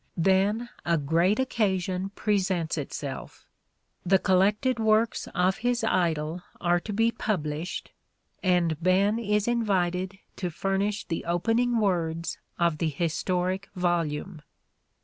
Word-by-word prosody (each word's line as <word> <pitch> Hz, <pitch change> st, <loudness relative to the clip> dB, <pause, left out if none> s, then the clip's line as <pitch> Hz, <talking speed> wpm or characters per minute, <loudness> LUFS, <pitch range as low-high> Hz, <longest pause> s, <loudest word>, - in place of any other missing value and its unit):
Then 195 Hz, +6 st, +2 dB, 0.2 s
a 170 Hz, -1 st, +2 dB
great 165 Hz, +7 st, +2 dB
occasion 190 Hz, -6 st, 0 dB
presents 185 Hz, -5 st, 0 dB
itself. 145 Hz, -2 st, -6 dB, 0.6 s
The 190 Hz, +1 st, +4 dB
collected 205 Hz, +7 st, +2 dB
works 220 Hz, +1 st, +2 dB
of 180 Hz, +2 st, +2 dB
his 245 Hz, +1 st, 0 dB
idol 170 Hz, -5 st, 0 dB, 0.2 s
are 175 Hz, 0 st, +2 dB
to 210 Hz, -, -6 dB
be 225 Hz, +3 st, +2 dB
published 170 Hz, -7 st, -3 dB, 0.5 s
and 175 Hz, -4 st, +1 dB
Ben 195 Hz, +5 st, +3 dB
is 210 Hz, -1 st, 0 dB
invited 190 Hz, -5 st, 0 dB, 0.2 s
to 180 Hz, -, -2 dB
furnish 195 Hz, +4 st, -1 dB
the 165 Hz, -, -3 dB
opening 225 Hz, +8 st, +1 dB
words 170 Hz, -5 st, 0 dB, 0.2 s
of 170 Hz, -3 st, +1 dB
the 165 Hz, -, +1 dB
historic 180 Hz, +4 st, -1 dB
volume. 175 Hz, -2 st, -1 dB
185 Hz, 115 wpm, -27 LUFS, 170-210 Hz, 0.6 s, The